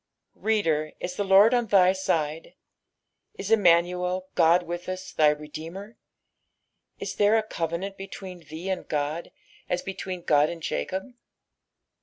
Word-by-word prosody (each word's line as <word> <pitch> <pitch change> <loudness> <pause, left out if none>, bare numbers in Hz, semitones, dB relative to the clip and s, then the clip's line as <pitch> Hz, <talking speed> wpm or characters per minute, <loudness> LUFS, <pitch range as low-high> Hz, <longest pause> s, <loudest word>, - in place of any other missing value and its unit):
i^oder, 165 -9 0
is 180 - -4
the 205 - -1
Lord 200 +4 +6
on 240 -2 +2
thj 190 -2 +5
side? 160 -4 -2 0.8
Is 200 +2 -5
Emmuiuel, 180 -2 +3
God 170 +1 +4
witb 175 +1 -5
tis, 185 0 -6
thy 150 -1 +5
Redeemei 160 +7 -8
I - - -30 1.0
Is - - -5
there 210 +2 +4
a 220 - +1
covenant 175 0 -4
between 190 -1 -8
thee 165 +2 -9
and 185 - -4
God 150 +3 -2 0.4
n 180 - +1
between 185 -2 -5
Ood 150 -1 +4
and 165 -2 -7
Jacob 190 +3 -2
180 Hz, 140 wpm, -26 LUFS, 165-195 Hz, 1.0 s, Lord